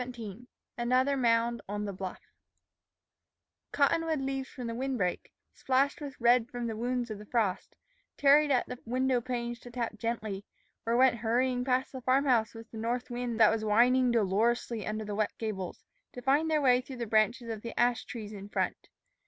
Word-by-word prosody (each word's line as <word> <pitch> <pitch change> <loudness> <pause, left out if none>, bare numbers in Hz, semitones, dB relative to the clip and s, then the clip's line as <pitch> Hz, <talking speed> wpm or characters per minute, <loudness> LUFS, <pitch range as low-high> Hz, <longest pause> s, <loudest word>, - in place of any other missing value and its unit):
XVII 240 -2 -8 0.3
ANOTHER 255 +3 +2
MOUND 235 -2 +2
ON 205 0 -3
THE 200 - -4
BLUFF 185 0 -7 1.4
COTTONWOOD 315 +2 +2
leaves 270 0 -3
from 250 - -7
the 230 - -3
wind 260 +2 -2
break, 180 -4 -2 0.2
splashed 270 +3 +1
with 285 -2 -7
red 240 0 +4
from 245 -1 -4
the 225 -1 -3
wounds 245 +1 -2
of 210 - -6
the 210 - -10
frost, 215 -6 -1 0.4
tarried 290 +1 +5
at 255 -3 +2
the 250 - -7
window 255 +1 +1
panes 240 -1 -3
to 245 - -11
tap 235 -3 -4
gently, 215 -4 -3 0.4
or 230 +1 +2
went 255 -1 +5
hurrying 245 +3 +1
past 255 +1 0
the 260 - -7
farm 260 +3 +2
house 235 -4 +2
with 225 0 -11
the 225 - -7
north 245 +3 -2
wind 240 -1 -3
that 220 - +7
was 220 -1 -1
whining 245 +4 +4
dolorously 230 +1 +1
under 215 0 -3
the 210 - -4
wet 210 0 0
gables, 195 -5 -5 0.3
to 245 - -7
find 290 +5 +3
their 310 -1 +2
way 250 -1 +5
through 260 0 -9
the 235 - -3
branches 225 +3 +2
of 220 -2 -4
the 230 0 -6
ash 240 0 +2
trees 215 -3 -7
in 200 0 -9
front. - - -2
240 Hz, 190 wpm, -30 LUFS, 220-255 Hz, 1.4 s, that